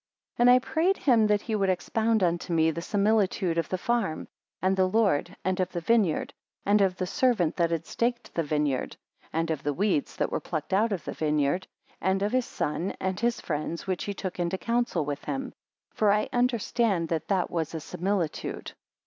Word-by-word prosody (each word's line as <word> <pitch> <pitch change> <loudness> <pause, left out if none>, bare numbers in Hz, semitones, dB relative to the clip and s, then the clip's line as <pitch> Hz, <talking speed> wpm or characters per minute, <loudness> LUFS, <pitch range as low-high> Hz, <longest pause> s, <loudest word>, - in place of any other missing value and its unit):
35 240 - +5
And - - +8
I 250 - +8
prayed 355 +5 +2
him 230 -6 +4
that 210 -1 +2
he 225 - -3
would 195 -3 +1
expound 220 +3 +1
unto 175 0 0
me 160 -1 +3
the 170 - -5
similitude 200 -4 +1
of 165 - -2
the 185 - -1
farm, 200 -5 -1 0.3
and 190 +1 +2
the 185 -1 +2
Lord, 195 -5 +1
and 185 0 0
of 185 0 0
the 175 - -2
vineyard, 195 -2 +1 0.3
and 205 +1 +4
of 190 -2 +2
the 185 - -1
servant 190 -5 +1
that 170 -2 +2
had 165 -1 -2
staked 240 0 -2
the 165 - 0
vineyard; 150 -3 -1 0.3
and 165 +1 -1
of 155 -3 -2
the 145 -1 -2
weeds 190 -6 0
that - - -1
were - - 0
plucked 155 +1 -4
out 215 +4 +3
of 190 -5 -3
the - - -4
vineyard; 150 +3 0 0.3
and 190 +1 +1
of 205 - 0
his 255 -1 +1
son 170 +5 -2
and 190 0 -2
his 235 +1 +1
friends 155 +1 -3
which 185 -2 -2
he 205 - -3
took 185 -2 -5
into 175 +2 0
counsel 230 -8 0
with 145 0 -4
him; 270 -1 -3 0.4
for 210 -2 +2
I 210 +1 +1
understand 235 -7 +1
that 165 -2 -2
that 190 -3 0
was 165 -1 -2
a - - -2
similitude. 180 0 -3
190 Hz, 205 wpm, -27 LUFS, 165-220 Hz, 0.4 s, And